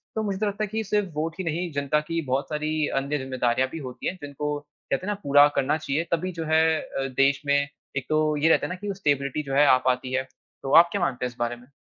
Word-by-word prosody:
तो 220 - 0
मुझे 200 -2 -2
तो 215 - +1
लगता 205 +1 -2
है 210 - -1
कि 220 +2 -2
सिर्फ़ 210 -1 0
वोट 160 +2 -2
ही - - -1
नहीं 170 +1 -2
जनता 140 +1 +1
की 165 0 0
बहुत 130 +3 -1
सारी 155 0 -1
अन्य 140 +2 -2
जिम्मेदारियाँ 130 -1 0
भी 165 - -6
होती 125 - -6
हैं 185 - -2
जिनको 145 +1 -3
कहते 145 +2 -5
हैं 210 - 0
ना - - -5
पूरा 145 +1 +7
करना 145 +3 +1
चाहिए 155 +1 -1
तभी 180 +3 0
जो 165 -2 -5
है 160 0 +5 0.2
अ, 135 0 -4
देश 135 +1 +2
में 140 0 +3 0.4
एक 135 - -2
तो 155 0 +2
ये 160 +3 +3
रहता - - +4
है - - -9
ना - - -5
कि 200 +1 -4
स्टेबिलिटी 145 -4 0
जो 135 -1 -5
है 145 +1 +6
आ 130 - +7
पाती 125 0 -1
है। 130 0 +1 0.4
तो 135 - -3
आप 170 +1 +8
क्या 200 - -1
मानते 125 -7 -1
हैं 125 - -1
इस - - -19
बारे 120 0 -1
में? 120 +1 -17
150 Hz, 270 wpm, -25 LUFS, 135-170 Hz, 0.4 s, आप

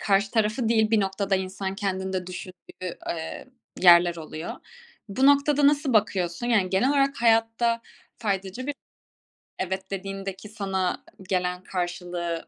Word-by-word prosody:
karşı 200 0 +2
tarafı 220 +1 +1
değil, 220 -2 +3
bir 220 -2 +4
noktada 195 0 0
insan 190 +1 -4
kendini 190 -1 -2
de 185 -1 -2
düşündüğü, 180 0 -8
eee, 160 +8 -5 0.3
yerler 175 -1 +7
oluyor. 160 0 -6 0.6
Bu 260 +7 +2
noktada 285 0 +5
nasıl 285 -2 +2
bakıyorsun? 190 -2 +1
Yani, 210 -6 +2
genel 195 +7 +2
olarak 275 -1 +2
hayatta 230 0 +3 0.4
faydacı 200 +2 -3
bir 290 - -2 0.9
evet 190 +1 -3
dediğindeki 195 +1 -5
sana 190 -4 -2 0.3
gelen 180 -1 -1
karşılığı 175 -2 -3
195 Hz, 130 wpm, -26 LUFS, 185-225 Hz, 0.9 s, yerler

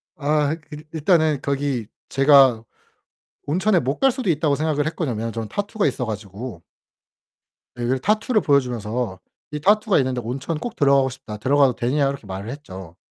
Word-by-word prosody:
아 150 0 +1 0.2
일 150 +1 -9
일단은 155 -3 +2
거기 140 -5 -2 0.2
제가 135 -4 +5 0.8
온천에 185 +5 +2
못 135 +3 -2
갈 270 -1 +4
수도 250 -7 -3
있다고 150 -2 +2
생각을 150 -1 0
했거든요, 115 -9 -3
저는 115 -1 -5
타투가 205 -3 -1
있어 125 -2 -2
가지고. 105 -2 -7 1.2
예. 120 - -4
그래서 130 +2 0
타투를 215 +2 +1
보여 140 -1 +4
주면서 115 -4 -4 0.3
이 150 - -4
"타투가 210 +4 +3
있는데 130 -2 -1
온천 135 +7 -4
꼭 240 +2 -5
들어가고 140 -2 +3
싶다. 120 -5 -9
들어가도 135 +2 +3
되냐?" 135 +4 +1
이렇게 140 -6 -6
말을 95 +4 -6
했죠. 95 - -9
140 Hz, 355 characters per minute, -22 LUFS, 120-155 Hz, 1.2 s, 제가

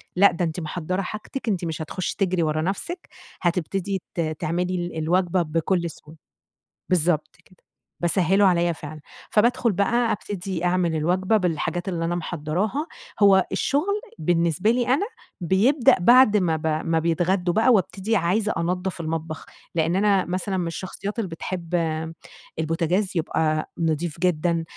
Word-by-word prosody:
"لأ، 200 +1 +6
ده 175 +1 -1
أنتِ 160 +2 -3
محضّرة 175 +3 -3
حاجتِك، 215 +6 -6
أنتِ 185 -4 -1
مش 160 -1 -4
هتخشّي 175 +3 -3
تجري 185 -3 +1
ورا 155 0 0
نفسِك، 270 - -4 0.3
هتبتدي 185 +2 -1
ت - - -4 0.2
تعملي 175 +3 -1
ال 175 -2 -4
الوجبة 175 +3 +1
بكل 170 +2 0
سهولة." 155 0 -14 0.7
بالضبط 160 -3 +1
كده، 185 - -22 0.4
باسهِّلُه 190 +3 +3
عليَّ 175 -2 +3
فعلًا، 155 0 -9 0.3
فبادخل 235 +1 +3
بقى 230 +5 +1
أبتدي 190 -4 -3
أعمِل 175 -2 +1
الوجبة 185 +7 +2
بالحاجات 175 +1 -1
اللي 165 -2 -2
أنا 175 +1 -1
محضّراها، 175 - -2 0.4
هو 190 -1 +6
الشغل 395 +9 0 0.2
بالنسبة 170 +5 +2
لي 245 0 0
أنا 280 +11 +2 0.4
بيبدأ 240 - +4
بعد 235 +1 +6
ما 170 -4 +1
ب 160 0 -3
ما 160 +1 +1
بيتغدّوا 175 +2 +1
بقى، 225 +6 +3
وابتدي 195 +2 0
عايزة 205 +4 +1
أنضّف 180 +2 -2
المطبخ، 160 0 -4 0.3
لإن 165 +2 +1
أنا 200 -1 +3
مثلًا 185 +2 -2
من 175 -2 -1
الشخصيات 195 +5 -5
اللي 205 -5 -2
بتحب 170 +1 -4 0.8
البوتاجاز 170 +5 0
يبقى 155 -1 0
نظيف 165 0 -1
جدًا 170 -1 +1
180 Hz, 145 wpm, -24 LUFS, 165-195 Hz, 0.8 s, لأ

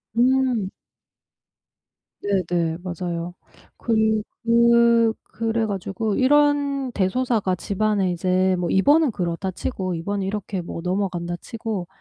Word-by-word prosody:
음. 250 -4 +2 1.5
네네, 175 -4 0
맞아요. 175 -1 -4 0.4
그리 220 -2 +1 0.2
그 235 -1 +4
그래 225 0 -2
가지고 200 +2 -2
이런 285 -1 +2
대소사가 205 -1 0
집안에 200 0 0
이제 185 +1 +1
뭐 175 -1 -2
이번은 290 +8 +4
그렇다 180 0 -3
치고, 185 -2 -3
이번은 195 +4 -3
이렇게 195 -1 -3
뭐 170 0 -6
넘어간다 180 -2 -2
치고 220 -4 -5
200 Hz, 235 characters per minute, -23 LUFS, 185-235 Hz, 1.5 s, 그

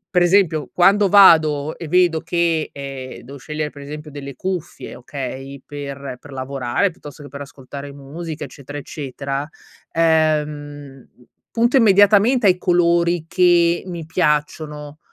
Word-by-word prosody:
Per 180 - +5
esempio, 175 -6 +2
quando 195 +2 +4
vado 155 -6 +5
e 165 - -7
vedo 175 -2 +3
che, 170 -2 0
ehm, 135 -2 -7
devo 140 +3 -10
scegliere, 150 +3 -4
per 140 - -12
esempio, 150 +1 -8
delle 140 -2 -8
cuffie, 185 -3 -5
okay, 135 +1 -7
per 140 -2 -7
per 145 - -13
lavorare 135 +6 -1
piuttosto 150 -3 -12
che - - -10
per 140 +2 -9
ascoltare 140 0 -9
musica, 150 +3 -7
eccetera, 140 +2 -10
eccetera, 140 0 -5 0.4
ehm, 150 -4 0 0.5
punto 235 +3 +1
immediatamente 210 +2 +5
ai 185 - +4
colori 170 -1 +2
che 175 -1 +3
mi 170 -3 -6
piacciono 150 -2 -2
150 Hz, 130 wpm, -20 LUFS, 140-175 Hz, 0.5 s, Per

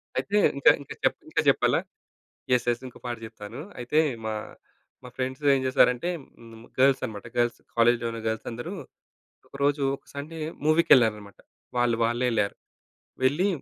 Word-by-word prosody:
అయితే, 205 - 0 0.2
ఇంకా 140 - +7
ఇంకా 140 - -8
చప్ - - +2
ఇంకా - - +1
చెప్పాలా? - - +3 0.7
యెస్. 125 -1 +3
యెస్. 120 +1 0
ఇంకో 125 - -13
పాట 120 -1 -3
చెప్తాను. 110 +2 -9 0.2
అయితే, 125 +6 +1 0.3
మా, 110 - -1 0.7
మా 125 - -9
ఫ్రెండ్సేం 135 +2 +1
చేశారంటే, 130 +3 +3 0.3
హ్మ్, 115 0 -13
గర్ల్స్ 135 0 +5
అనమాట 105 -2 -8
గర్ల్స్. 120 0 +1 0.2
కాలేజ్‌లోన 115 0 +2
గర్ల్సందరూ 115 +2 -4 0.8
ఒకరోజు, 140 +1 0
ఒక - - -30
సండే 150 +3 -6 0.3
మూవీ‌కేళ్ళారనమాట. 120 - +4 0.4
వాళ్ళు 120 -1 +2
వాళ్ళే 120 +2 +1
యెళ్ళారు. 105 -3 0 0.7
వెళ్ళి 145 +9 +3
120 Hz, 130 wpm, -26 LUFS, 115-140 Hz, 0.8 s, ఇంకా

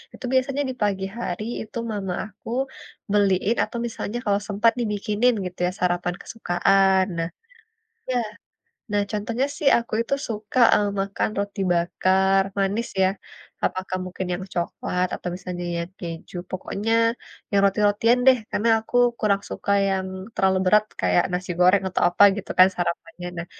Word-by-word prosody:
itu - - -8
biasanya 265 +2 +1
di - - -3
pagi 195 -2 0
hari 195 -3 -3 0.2
itu - - -8
mama 195 -3 -3 0.2
aku, 210 +3 -12 0.6
beliin, 200 +1 +2
atau - - -5
misalnya 230 0 -5
kalau 200 -1 +2
sempat 210 +3 +3
dibikinin 210 +2 +1
gitu 180 0 -7
ya, - - -1
sarapan 175 0 0
kesukaan. 190 -1 +2
Nah 165 0 -1 0.8
iya. 250 -1 +1 0.7
Nah, 205 0 +2
contohnya 225 +5 -1
sih 295 - +2
aku 235 0 -7
itu 275 - 0
suka, 215 +2 -4 0.2
eee, 205 -1 +2
makan 195 +2 -1
roti 200 0 -3
bakar, 190 +3 +2 0.2
manis 200 +4 0
ya, 185 - +5 0.6
apakah 185 0 -2
mungkin 185 0 -5
yang 180 - -5
coklat 180 +1 -1
atau - - -5
misalnya 180 -1 -6 0.2
yang 170 - -15
keju, 170 0 -7
pokoknya 200 +4 -3 0.6
yang 200 - +4
roti-rotian 210 +4 +3
deh, 260 -1 +7
karena 225 +3 0
aku 235 - -4 0.2
kurang 200 -2 +2
suka 200 - -2 0.2
yang 190 -1 -1 0.3
terlalu 190 0 +2
berat, 210 +3 +5 0.2
kayak 90 -1 +3
nasi 180 +1 -3
goreng, 185 +2 +5
atau 185 - -2
apa, 175 +3 +2
gitu 205 - -7
kan, 185 - +10
sarapannya. 175 0 -4
Nah, 170 - -4
195 Hz, 155 wpm, -24 LUFS, 185-215 Hz, 0.8 s, kan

